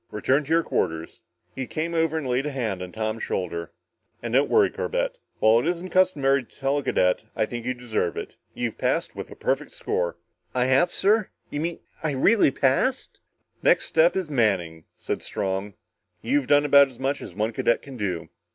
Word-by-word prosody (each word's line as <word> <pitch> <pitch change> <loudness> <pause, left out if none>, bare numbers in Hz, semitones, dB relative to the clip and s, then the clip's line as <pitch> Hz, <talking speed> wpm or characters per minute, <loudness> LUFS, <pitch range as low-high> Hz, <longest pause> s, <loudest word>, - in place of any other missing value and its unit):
Return 130 +7 +1
to - - -13
your 165 +1 +3
quarters." 80 - -2 0.3
He 130 -1 -4
came 165 +5 -3
over 160 -1 +1
and 150 -4 -3
laid 130 +3 0
a - - -3
hand 110 -9 -2
on 90 -1 -6
Tom's 110 0 -3
shoulder. 85 -2 -3 0.5
"And 120 -1 -4
don't 135 +3 +3
worry, 420 -3 +4
Corbett. - - -2 0.2
While 110 +1 +5
it 125 - -2
isn't 175 +1 -2
customary 140 -8 +3
to - - -23
tell 140 +1 +1
a - - -6
cadet, 90 0 +1
I - - +1
think 120 +1 -6
you 130 - 0
deserve 115 -8 -2
it. - - -6 0.2
You've 120 -3 -3
passed - - 0
with - - -6
a - - -10
perfect - - -2
score!" 85 -1 -2 0.4
"I 125 0 +2
have, 135 +7 +3
sir? 210 +1 +2 0.2
You 145 - -3
mean 170 +1 -3 0.2
I 155 -2 -1
really 200 +8 +4
passed?" 135 - 0 0.4
"Next - - +4
step 165 +2 +3
is 190 -3 -1
Manning," 95 - 0
said - - -3
Strong. 95 +1 -3 0.5
"You've 145 -3 +1
done 145 0 +3
as 140 -3 +6
much 135 +2 -1
as 85 - -9
one 110 +3 -1
cadet 120 - +1
can 135 -2 -10
do." 95 -7 -3
130 Hz, 195 wpm, -25 LUFS, 110-160 Hz, 0.5 s, as